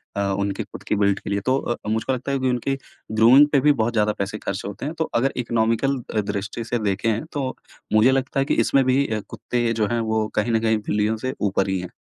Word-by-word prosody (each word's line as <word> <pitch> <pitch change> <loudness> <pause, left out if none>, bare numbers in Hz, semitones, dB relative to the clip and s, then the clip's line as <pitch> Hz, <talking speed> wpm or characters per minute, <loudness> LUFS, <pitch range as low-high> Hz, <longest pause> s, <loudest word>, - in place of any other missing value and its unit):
अ, 100 - 0 0.2
उनके 100 -1 -2
खुद - - -11
की - - -1
बिल्ड 100 -1 +2
के - - -7
लिए। 100 0 0
तो 130 +1 +3
अ, 120 - -2
मुझको 110 +4 0
लगता 130 +2 -3
है 135 - 0
कि 130 - +1
उनकी 125 +2 -1 0.3
ग्रूमिंग 120 +7 +7
पे 140 - +4
भी 150 +2 +5
बहुत 120 +2 -1
ज़्यादा 105 -1 +2
पैसे 100 +2 -3
खर्च 100 - -4
होते 100 +6 -6
हैं। 155 - -3
तो 160 - 0
अगर 130 +3 +2
इकोनॉमिकल 115 +3 +1 0.3
दृष्टि 105 +3 -4
से 120 +1 -2
देखें 110 +6 -1
तो 135 -3 -2 0.4
मुझे 110 +4 +6
लगता 135 +1 0
है 135 - +2
कि - - 0
इसमें 135 - +3
भी 130 +2 +3
अ, 110 -2 -1
कुत्ते 120 -1 -1
जो 110 -2 0
हैं 120 - +1
वो 110 -1 0
कहीं 110 +2 +1
न 115 - +3
कहीं 110 -1 +2
बिल्लियों 105 +2 +1
से 130 - -2
ऊपर 100 -1 +1
ही 95 -1 0
हैं। 90 - -6
115 Hz, 245 wpm, -23 LUFS, 105-130 Hz, 0.4 s, ग्रूमिंग